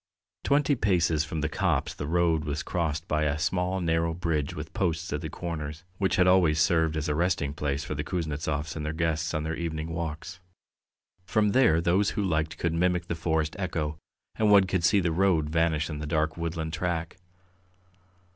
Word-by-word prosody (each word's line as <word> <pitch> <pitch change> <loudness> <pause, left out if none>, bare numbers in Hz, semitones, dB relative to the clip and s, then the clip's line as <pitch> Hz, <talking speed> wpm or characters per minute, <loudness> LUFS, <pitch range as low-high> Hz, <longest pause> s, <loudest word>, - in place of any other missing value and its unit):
Twenty 145 +1 +3
paces 85 - +2
from 80 0 -4
the 75 - +1
copse 80 - 0
the 70 - -5
road 85 -1 +2
was 75 -1 -3
crossed 80 -2 -2
by 75 0 +1
a 70 0 0
small 90 +3 0
narrow 80 -1 0
bridge 80 -5 -1
with - - -7
posts 85 -4 -1
at 75 - -2
the 80 - -4
corners, 80 -2 -5 0.2
which 95 -2 +1
had 90 - +4
always 90 -4 +4
served 80 -1 +2
as 75 - -2
a 75 - +1
resting 80 -3 0
place 75 0 -2
for 80 - -4
the 75 0 -3
Kuznetsovs 75 -2 -3
and 80 - -4
their 75 +1 -2
guests 80 0 -1
on 75 - -1
their 80 +1 -2
evening 80 -1 -4
walks. 80 +2 -5 0.8
From 105 +4 +2
there 120 -10 +4
those 90 +4 +2
who 105 - +1
liked 80 -4 -1
could 85 -1 -1
mimic 90 0 +1
the - - 0
forest 80 -1 -1
echo, 80 -5 -2 0.4
and 110 -1 +3
one 100 -1 +7
could 95 -2 -1
see 100 +4 +4
the 85 -2 0
road 80 -4 +2
vanish 80 -1 +1
in 75 -2 -5
the 75 - -4
dark 80 0 0
woodland 80 -1 -3
track. 85 0 -2
80 Hz, 195 wpm, -27 LUFS, 75-90 Hz, 0.8 s, one